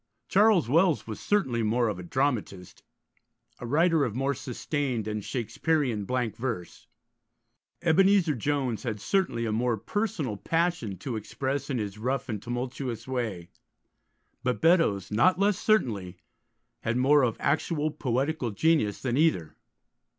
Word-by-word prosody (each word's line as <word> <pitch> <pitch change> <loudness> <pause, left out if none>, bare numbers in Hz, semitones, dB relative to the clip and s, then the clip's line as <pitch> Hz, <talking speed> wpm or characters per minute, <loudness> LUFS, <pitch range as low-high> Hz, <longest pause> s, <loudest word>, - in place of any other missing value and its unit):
Charles 205 - +4
Wells 165 +4 +3
was 110 -2 -6
certainly 130 - +1
more 115 +2 +1
of 105 -4 -3
a - - -5
dramatist, 105 -3 -2 0.8
a 120 - -6
writer 160 +3 +3
of 115 -5 -2
more 135 +2 0
sustained 130 -2 -3
and 105 -1 -3
Shakespearean 120 0 -1
blank 125 -1 -1
verse; 115 -8 -5 1.0
Ebenezer 180 0 +4
Jones 130 -2 -1
had 110 -5 -4
certainly 115 - 0
a 110 - -1
more 115 +1 0
personal 175 - -2
passion 165 - -1
to 125 +3 -5
express 135 +6 -3
in 135 - -1
his 105 -2 -4
rough 130 +3 -2
and 105 -3 -3
tumultuous 120 -1 -4
way; 110 -10 -3 0.9
but 125 -1 -1
Beddoes, 160 - +3
not 120 - +4
less 200 0 +2
certainly, 105 - +1 0.6
had 115 +1 -1
more 140 +3 +5
of 120 -4 0
actual 155 +1 0
poetical 135 -1 -1
genius 110 -2 +1
than 125 -1 0
either. 90 - +1
125 Hz, 135 wpm, -27 LUFS, 110-155 Hz, 1.0 s, more